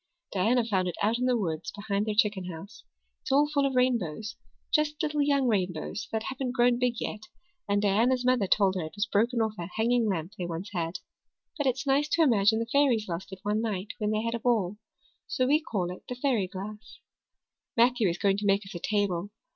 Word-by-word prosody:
Diana 225 +5 +2
found 190 -5 0
it 175 - -3
out 225 +3 +2
in 250 - 0
the 250 -1 +3
woods 165 -6 -3
behind 205 0 -2
their 215 - -1
chicken 205 -3 +2
house. 180 +3 -9 0.4
It's - - -5
all 285 +2 +5
full 285 -2 +1
of 265 - -3
rainbows 230 -5 0 0.4
just 300 0 +2
little 300 -1 0
young 280 -2 +2
rainbows 185 -3 -1
that 220 0 -1
haven't 260 -1 -3
grown 245 -1 +3
big 250 -1 +1
yet 215 0 -5 0.4
and 205 0 +2
Diana's 240 +6 +2
mother 250 -6 +3
told 195 0 +3
her 185 - -2
it 155 - -9
was 205 0 0
broken 230 +3 +1
off 220 -1 0
a 170 - -4
hanging 235 +1 +2
lamp 175 0 -3
they 175 - -2
once 175 +4 -5
had. 170 -1 -2 0.6
But 290 -4 -1
it's 260 +2 0
nice 280 +2 +2
to 335 - +4
imagine 220 -5 +4
the 230 - -1
fairies 240 -3 +2
lost 175 +2 -5
it 190 -1 -9
one 210 +1 0
night 205 -3 -3
when 210 -1 0
they 215 0 0
had 230 0 -1
a 235 - -2
ball, 210 -5 +1 0.5
so 255 - 0
we 290 +4 +4
call 190 - -2
it 180 - -9
the 250 - -3
fairy 245 -7 +1
glass. 210 +3 -8 0.8
Matthew 235 -3 +4
is 170 - -2
going 195 0 +2
to 205 0 -2
make 200 +1 +2
us 195 - -10
a 175 - -5
table. 200 -2 -1
215 Hz, 220 wpm, -28 LUFS, 195-250 Hz, 0.8 s, all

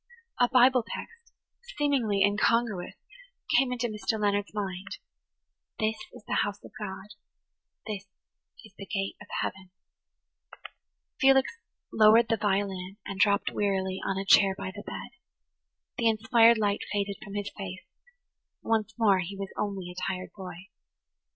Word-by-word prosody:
A 245 -1 +4
Bible 255 0 +5
text, 465 - -9 0.5
seemingly 250 -9 +2
incongruous, 210 -1 +1 0.6
came 265 -2 +4
into 245 -1 -2
Mr. 215 0 -2
Leonard's 205 -1 0
mind–"This 205 +2 -6 0.2
is - - -13
the - - +1
house 205 0 -3
of - - -12
God; 190 -2 -6 0.8
this 205 -2 -5 0.6
is 215 - -16
the 195 - -8
gate 195 -4 -2
of 210 - -11
heaven." 190 -1 -5 1.5
Felix 270 - +4 0.4
lowered 220 +2 +6
the 225 - +2
violin 195 -2 -1
and 195 - -6
dropped 200 -1 +3
wearily 190 -2 -1
on 195 -1 -1
a 195 - -3
chair 195 0 +6
by 190 - -5
the 205 - -7
bed. - - -7 0.9
The 230 -1 +4
inspired 225 +1 +5
light 205 -2 0
faded 200 -1 -1
from 200 -1 -9
his 205 0 -3
face; 190 -2 -7 0.8
once 220 -1 0
more 205 -5 +4
he 190 +2 -5
was 195 -1 -6
only 195 -4 -3
a 180 - -4
tired 185 0 -6
boy. 185 -1 -9
205 Hz, 140 wpm, -28 LUFS, 195-225 Hz, 1.5 s, lowered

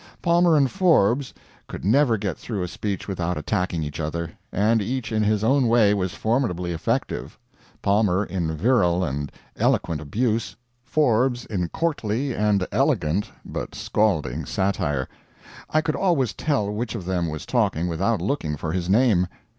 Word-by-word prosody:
Palmer 170 -2 +4
and 135 -3 +3
Forbes 140 - +3 0.4
could - - -7
never 120 +2 +4
get 100 -4 -2
through 105 -6 -4
a - - -2
speech 100 +2 -4
without 90 -2 -2
attacking 85 +1 -1
each 75 +1 -6
other, 85 +2 -3 0.2
and 110 +3 +2
each 125 +4 -3
in 110 -1 +1
his 105 0 +1
own 130 +2 +3
way 115 -3 +4
was 95 -3 -2
formidably 110 -7 0
effective 80 - -2 0.5
Palmer 100 -1 +2
in 85 -5 -2
virile 90 -3 +3
and 70 -2 -3 0.3
eloquent 80 -3 +1
abuse, 110 - -1 0.3
Forbes 125 -3 +1
in 90 -5 -2
courtly 135 -5 -1
and 105 -3 +1
elegant 80 +7 +1 0.2
but - - -5
scalding 105 -8 0
satire. 75 -9 -1 0.6
I 155 - +2
could 155 0 -1
always 165 - +1
tell 135 -10 0
which 115 +2 -3
of 90 - -5
them 90 -2 0
was 75 0 -6
talking 85 +3 +1
without 90 +7 0
looking 80 - -1
for 80 - -3
his 90 0 -2
name. 100 -4 +4
105 Hz, 155 wpm, -24 LUFS, 90-125 Hz, 0.6 s, Palmer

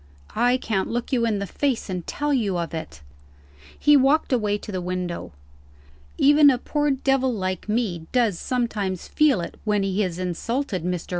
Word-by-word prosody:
I 245 +3 +3
can't 220 -6 -2
look 240 +3 -3
you 235 -2 +2
in 215 -2 0
the 200 - -3
face, 265 +4 -1
and 180 -3 -5
tell 295 0 -1
you 205 -8 0
of 170 -1 -3
it." 160 - -7 0.8
He 295 0 +5
walked 280 +1 +3
away 210 -4 +1
to 210 - -9
the 185 -2 -3
window. 180 - -4 0.9
"Even 290 +1 +6
a 260 - +3
poor 295 +3 -1
devil, 270 -1 +1
like 185 -3 -3
me, 200 -8 -1
does 230 -8 +1
sometimes 215 -7 -2
feel 290 -11 +3
it 170 - -7
when 210 -2 +1
he 195 +1 0
is 180 -4 -2
insulted. 185 - -2
Mr. 180 -1 -3
215 Hz, 175 wpm, -24 LUFS, 185-260 Hz, 0.9 s, Even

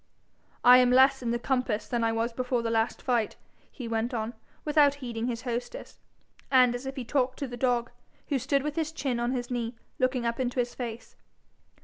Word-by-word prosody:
'I 250 0 +9
am 250 -1 +4
less 265 +1 +5
in 240 - -2
the 235 - +1
compass 240 -4 -1
than 240 -1 -1
I 225 - +2
was 230 +1 -1
before 250 0 -1
the 230 - -1
last 225 0 0
fight,' 240 -4 0 0.4
he 250 -4 -7
went 230 +2 -1
on, 225 +1 -3 0.3
without 295 -2 +4
heeding 240 -4 -4
his 235 -1 -3
hostess, 245 - -5 0.5
and 255 -2 +5
as 245 +2 -5
if 270 - -5
he 260 -3 -5
talked 260 0 0
to 280 - -3
the 245 - -7
dog, 240 -1 0 0.4
who 280 -3 +1
stood 275 +2 +1
with 300 0 -3
his 320 -1 -1
chin 270 -6 -2
on 240 +1 0
his 245 -1 -3
knee, 240 -1 -2 0.2
looking 255 -1 +1
up 235 +1 -1
in 255 -2 +1
his 245 -1 -2
face. 235 -2 -7
245 Hz, 210 wpm, -28 LUFS, 235-260 Hz, 0.5 s, I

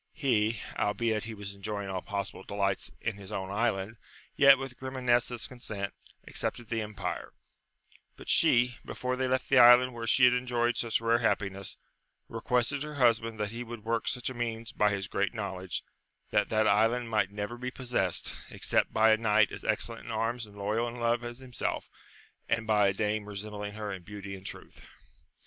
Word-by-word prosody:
He, 115 -7 +1 0.2
albeit 110 +1 0
he 110 -1 -6
was 100 -1 -7
enjoying 100 0 -5
all 95 -1 -3
possi 100 +1 -3
ble - - -11
delights 100 -8 -1
in 110 -3 -2
his 100 0 -9
own 95 -2 -4
island, 105 0 -1 0.4
yet, 140 -1 +8
with 135 -1 -6
Grimanesa*s 125 -2 +1
consent, 110 -6 -5 0.3
accepted 120 -2 -2
the 115 -1 -1
empire; 105 -1 -5 0.8
but - - -13
she, 125 0 +4
before 125 0 -3
they 130 0 0
left 130 0 0
the 135 - +5
island 125 +1 +8
where 115 -1 -5
she 125 +3 +6
had 125 - +6
enjoyed 120 -1 +1
such 115 -1 0
rare 115 +1 +3
happi 105 -4 +1
ness, 95 -1 -6 0.5
requested 125 +4 0
her 150 0 -5
husband 115 -4 +2
that 105 -1 -1
he 120 +2 -5
would 120 -2 -8
work 115 0 -1
such 125 - -1
a - - -6
means 115 -2 -3
by 105 - +3
his 100 -2 -2
great 100 +3 -1
knowledge, 95 -4 -4 0.5
that - - +2
that 110 0 +2
island 115 +4 +3
might 110 -4 +1
never 105 +3 -4
be 125 +1 -4
possessed, 120 -9 -1 0.2
except - - +1
by 110 0 +5
a 110 - +5
knight 110 -1 +3
as - - -7
excellent 115 +1 -1
in 115 - -6
arms 115 +1 -1
and 105 0 -16
loyal 105 +4 0
in 120 - -6
love 120 0 0
as 120 0 -6
himself, 130 -2 -3 0.6
and 115 - +1
by 105 -2 +4
a 100 - +2
dame 105 +1 -1
resembling 105 0 -5
her 105 -1 -5
in 95 - -7
beauty 100 +1 -8
and 95 0 -9
truth. - - -9
115 Hz, 190 wpm, -30 LUFS, 105-120 Hz, 0.8 s, yet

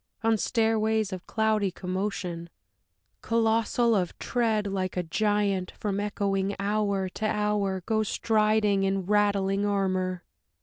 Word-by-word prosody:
on 225 0 +3
stairways 220 -2 +1
of 185 -1 -7
cloudy 220 -2 +1
commotion, 185 -2 -4 0.7
Colossal 230 +1 +2
of 180 -4 -1
tread, 225 -4 0
like 190 -2 -2
a 180 - 0
giant, 200 +1 0
from 200 -2 -2
echoing 200 -1 -1
hour 200 -1 0
to 215 +4 -3
hour 210 -3 0
Goes 220 -1 0
striding 215 -2 +2
in 195 -1 0
rattling 200 -1 +2
armor.... 185 -3 0
205 Hz, 120 wpm, -27 LUFS, 190-215 Hz, 0.7 s, on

